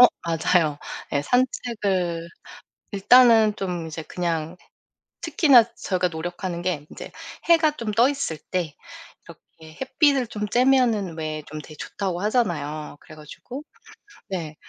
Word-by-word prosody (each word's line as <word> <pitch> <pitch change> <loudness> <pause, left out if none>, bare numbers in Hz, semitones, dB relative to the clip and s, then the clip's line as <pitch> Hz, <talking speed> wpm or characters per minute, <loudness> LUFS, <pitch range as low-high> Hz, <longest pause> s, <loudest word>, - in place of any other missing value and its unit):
어 250 - +11 0.2
맞아요. 165 -2 +1 0.3
네. 140 - 0
산책을 195 - 0 0.6
일단은 225 +1 +6
좀 180 -5 -4
이제 160 0 -6
그냥 165 0 -3 0.7
특히나 290 -7 +5
저희가 185 -1 0
노력하는 175 +2 -5
게 175 -5 -2
인제 - - -9 0.4
해가 325 -2 +5
좀 225 -6 -3
떠 235 +5 +4
있을 275 - -3
때 175 -5 -2 0.5
이렇게 160 0 -16
햇빛을 275 -1 +2
좀 210 -1 -5
쬐면은 235 -6 +2
왜 155 -1 -4
좀 155 +1 -7
되게 155 - -13
좋다고 185 +2 -4
하잖아요. 160 - -1
그래 155 - -14
가지고 200 - -10 0.7
네 165 -5 -4
185 Hz, 255 characters per minute, -24 LUFS, 160-240 Hz, 0.7 s, 어